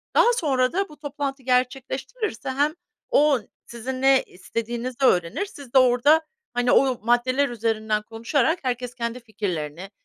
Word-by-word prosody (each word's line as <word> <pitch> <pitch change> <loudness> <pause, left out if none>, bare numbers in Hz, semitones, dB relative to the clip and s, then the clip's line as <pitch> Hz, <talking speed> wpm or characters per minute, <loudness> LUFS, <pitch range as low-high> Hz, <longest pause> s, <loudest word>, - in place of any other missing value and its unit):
daha 480 +1 +5
sonra 265 - +1
da 390 +1 0
bu 300 - -14
toplantı 280 -2 -4
gerçekleştirilirse 260 - -1
hem 290 +4 +1 0.4
o 290 -3 +4 0.3
sizin 255 +2 -6
ne 270 0 +5
istediğinizi 235 +6 -4
öğrenir, 180 - +2
siz 280 -10 -13
de - - +6
orada, 255 +6 +5 0.3
hani, 245 0 +1
o 260 -3 +3
maddeler 255 +3 +2
üzerinden 220 -2 -1
konuşarak 235 +9 0
herkes 250 -1 -2
kendi 235 0 -3
fikirlerini, 190 -6 -5
255 Hz, 135 wpm, -24 LUFS, 230-280 Hz, 0.4 s, de